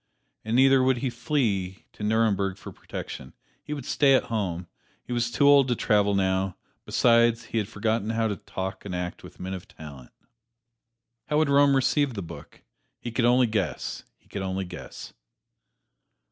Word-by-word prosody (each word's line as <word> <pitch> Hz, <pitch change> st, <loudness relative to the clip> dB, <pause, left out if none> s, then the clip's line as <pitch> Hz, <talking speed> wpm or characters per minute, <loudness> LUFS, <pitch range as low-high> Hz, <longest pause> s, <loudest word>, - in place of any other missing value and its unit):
And 110 Hz, +2 st, -2 dB
neither 135 Hz, +1 st, +6 dB
would 130 Hz, 0 st, +3 dB
he 125 Hz, +1 st, -2 dB
flee 115 Hz, -, -1 dB
to -, -, -14 dB
Nuremberg 105 Hz, -3 st, +1 dB
for -, -, -10 dB
protection; 65 Hz, -, -8 dB, 0.3 s
he -, -, -10 dB
would 145 Hz, -4 st, -4 dB
stay 140 Hz, -2 st, +4 dB
at -, -, +2 dB
home 90 Hz, -5 st, -2 dB, 0.4 s
he 125 Hz, -, -6 dB
was 120 Hz, -1 st, 0 dB
too 130 Hz, +5 st, +2 dB
old 140 Hz, -2 st, +6 dB
to 120 Hz, -, +1 dB
travel 105 Hz, -3 st, +2 dB
now 95 Hz, -1 st, 0 dB, 0.3 s
besides, 115 Hz, -1 st, +3 dB
he 115 Hz, 0 st, -2 dB
had 105 Hz, -, -2 dB
forgotten 110 Hz, 0 st, -1 dB
how 115 Hz, 0 st, +1 dB
to 105 Hz, -, -2 dB
talk 95 Hz, 0 st, -6 dB
and 95 Hz, -3 st, -5 dB
act 90 Hz, 0 st, -4 dB
with -, -, -14 dB
men 95 Hz, +1 st, -5 dB
of 95 Hz, -2 st, -7 dB
talent. 70 Hz, -5 st, -12 dB, 1.2 s
How 150 Hz, -, +1 dB
would 155 Hz, -2 st, +3 dB
Rome 140 Hz, 0 st, +5 dB
receive 135 Hz, 0 st, +1 dB
the 100 Hz, -, -4 dB
book? 85 Hz, -, -12 dB, 0.4 s
He 120 Hz, -, -6 dB
could 120 Hz, +1 st, +1 dB
only 125 Hz, +1 st, +5 dB
guess 105 Hz, -7 st, -2 dB, 0.2 s
he -, -, -32 dB
could 100 Hz, -, -5 dB
only 95 Hz, 0 st, -2 dB
guess. 90 Hz, 0 st, -9 dB
110 Hz, 175 wpm, -26 LUFS, 95-125 Hz, 1.2 s, neither